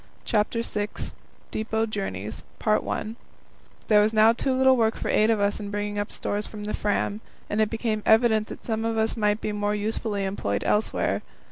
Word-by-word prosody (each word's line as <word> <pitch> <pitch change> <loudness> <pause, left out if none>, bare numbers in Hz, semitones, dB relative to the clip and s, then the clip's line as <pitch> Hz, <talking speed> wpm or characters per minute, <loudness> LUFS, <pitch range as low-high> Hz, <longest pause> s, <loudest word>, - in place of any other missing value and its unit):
CHAPTER 230 +1 +1
VI 210 -2 -2 0.6
Depot 220 +1 0
Journeys 110 - -4 1.4
There 210 -1 +6
was 215 +1 +2
now 220 +1 +6
too 265 +3 0
little 260 0 +5
work 225 -2 +2
for - - -4
eight 215 +1 +4
of 225 -2 +3
us 200 0 +1
in 205 -1 -5
bringing 205 0 -2
up 205 - -3
stores 205 +1 -3
from 210 -1 -8
the 210 - -3
Fram, 205 0 -1 0.3
and 210 +1 +2
it 215 - +2
became 220 -1 -1
evident 220 -1 +4
that - - -9
some 225 -1 -1
of 225 0 -1
us 220 0 +1
might 210 -1 +1
be 215 - -2
more 205 0 0
usefully 210 -1 -2
employed 100 - -2
elsewhere. 210 +1 +1
215 Hz, 180 wpm, -26 LUFS, 205-225 Hz, 1.4 s, There